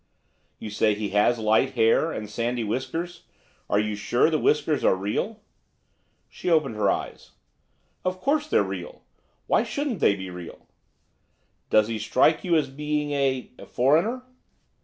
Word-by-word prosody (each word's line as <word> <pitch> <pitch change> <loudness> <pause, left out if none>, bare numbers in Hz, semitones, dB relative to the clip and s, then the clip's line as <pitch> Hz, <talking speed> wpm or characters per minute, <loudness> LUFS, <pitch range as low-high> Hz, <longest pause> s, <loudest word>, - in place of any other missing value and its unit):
'You 110 - -7
say 105 0 +2
he 105 -1 -3
has 105 +4 +3
light 110 +4 +2
hair, 115 +8 +3
and 105 -7 -5
sandy 120 +3 -2
whiskers. 130 +10 -4 0.4
Are - - +2
you 105 0 -1
sure 120 +9 +1
the 155 - +1
whiskers 150 0 +1
are - - +4
real?' 105 - -3 0.9
She - - -5
opened 155 -7 +2
her 105 -2 +1
eyes. - - -4 0.7
'Of 185 0 -2
course 295 +6 0
they're - - +3
real. - - -7 0.4
Why - - +3
shouldn't 280 - -3
they 100 - +4
be 95 -1 -7
real?' 90 -1 -10 1.0
'Does 110 -1 +4
he 115 -1 -3
strike 130 +8 +2
you 175 -3 +2
as 155 - +2
being 150 +1 -2
a 135 -2 -1 0.2
foreigner? 165 - +2
130 Hz, 150 wpm, -25 LUFS, 105-165 Hz, 1.0 s, are